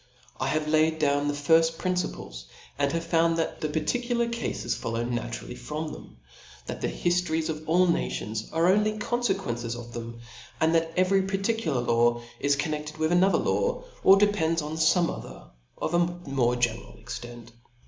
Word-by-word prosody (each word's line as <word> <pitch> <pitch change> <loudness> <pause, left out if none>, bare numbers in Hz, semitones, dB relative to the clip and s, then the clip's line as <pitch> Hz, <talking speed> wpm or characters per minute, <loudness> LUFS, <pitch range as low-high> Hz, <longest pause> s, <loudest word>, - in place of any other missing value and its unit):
I 130 - 0
have 150 +2 0
laid 155 +1 +3
down 145 -1 +1
the 145 - 0
firft 165 +3 +3
principles, 180 - -3 0.3
and 140 -1 +2
have 165 +1 -1
found 165 0 +2
that 165 - -2
the 155 - -1
particular 235 +9 0
cafes 235 0 -2
follow 115 0 -3
naturally 120 - -4
from 155 +1 -5
them; - - -11 0.5
that - - -6
the - - 0
hidories 165 - 0
of 155 0 -5
all 180 +3 +5
nations 110 - -2
are 165 +1 +2
only 215 +1 +1
confequences 120 - -1
of 120 0 -9
them; 115 0 -7 0.4
and 160 +1 +3
that 165 0 +2
every 190 +1 +4
particular 195 - -1
law 120 0 +2 0.2
is 140 0 +2
connected 150 0 -3
with 155 +1 0
another 185 +2 +4
law, - - 0 0.2
or 195 - +8
depends 170 -6 +2
on 150 - -5
fome 165 +2 +3
other - - -11 0.3
of 155 - -3
a 175 - +4
more 140 -9 0
general 120 -2 -2
extent. 120 -1 -8
160 Hz, 165 wpm, -27 LUFS, 125-175 Hz, 0.5 s, or